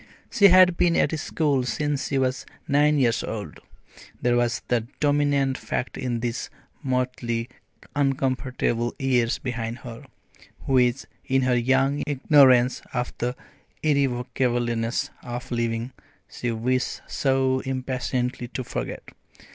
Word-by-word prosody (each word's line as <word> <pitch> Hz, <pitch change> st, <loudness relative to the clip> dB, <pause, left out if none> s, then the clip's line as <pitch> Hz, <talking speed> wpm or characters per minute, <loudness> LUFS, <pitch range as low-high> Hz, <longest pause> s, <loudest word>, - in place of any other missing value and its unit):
She 205 Hz, -, +6 dB
had 180 Hz, -1 st, +6 dB
been 170 Hz, -1 st, +3 dB
at -, -, +2 dB
school 145 Hz, -4 st, 0 dB
since 145 Hz, +3 st, -1 dB
she 140 Hz, -, -1 dB
was 130 Hz, -1 st, 0 dB, 0.2 s
nine 150 Hz, +1 st, +3 dB
years 120 Hz, -4 st, +2 dB
old 105 Hz, -2 st, -6 dB, 0.6 s
there 120 Hz, 0 st, +2 dB
was 120 Hz, -1 st, 0 dB
the 115 Hz, -2 st, 0 dB
dominant 145 Hz, -2 st, +2 dB
fact 125 Hz, -, -3 dB
in 120 Hz, -3 st, -3 dB
these 120 Hz, 0 st, -3 dB, 0.3 s
motley 125 Hz, -3 st, -2 dB, 0.5 s
uncomfortable 130 Hz, -4 st, 0 dB
years 125 Hz, -3 st, +1 dB
behind 115 Hz, -2 st, -4 dB
her, 115 Hz, -2 st, -9 dB, 0.6 s
which, 125 Hz, -1 st, +2 dB, 0.2 s
in 135 Hz, 0 st, +2 dB
her 125 Hz, -1 st, +2 dB
young 135 Hz, +4 st, +2 dB
ignorance 130 Hz, -3 st, +4 dB
of 125 Hz, 0 st, -2 dB
the 125 Hz, +1 st, -1 dB, 0.5 s
irrevocableness 125 Hz, -4 st, 0 dB
of 120 Hz, 0 st, -7 dB
living, 115 Hz, +1 st, -2 dB, 0.3 s
she 120 Hz, -, -4 dB
wished 120 Hz, +2 st, -1 dB
so 130 Hz, -1 st, +1 dB
impatiently 130 Hz, -1 st, -2 dB
to 130 Hz, +1 st, -5 dB
forget. -, -, -5 dB
130 Hz, 120 wpm, -24 LUFS, 120-135 Hz, 0.6 s, She